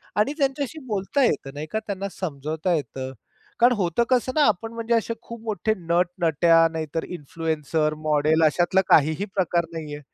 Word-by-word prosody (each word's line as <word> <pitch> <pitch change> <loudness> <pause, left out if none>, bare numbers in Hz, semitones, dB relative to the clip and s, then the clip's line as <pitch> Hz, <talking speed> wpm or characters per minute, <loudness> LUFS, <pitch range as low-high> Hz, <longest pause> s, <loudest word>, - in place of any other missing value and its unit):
आणि 210 +7 +2
त्यांच्याशी 280 +2 -1
बोलता 210 +6 0
येत. 145 - +1
नाही 150 +2 -6
का? 220 - 0
त्यांना 200 -2 -5
समजवता 160 +1 -3
येतं. 130 -3 -5 0.5
कारण 240 +2 +6
होतं 195 +3 +1
कसं 255 0 +2
ना, 310 - +4
आपण 225 +2 -1
म्हणजे 230 0 -2
असे 230 0 0
खूप 235 0 -9
मोठे 220 -1 0
नट-नट्या, 170 -1 +3
नाहीतर 160 0 -3
इन्फ्लुएन्सर, 155 -1 -2
मॉडेल, 155 +2 +3
अशातला 175 +5 +3
काहीही 155 +5 +4
प्रकार 175 -3 +1
नाहीये. 150 -2 -6
175 Hz, 155 wpm, -24 LUFS, 155-220 Hz, 0.5 s, कारण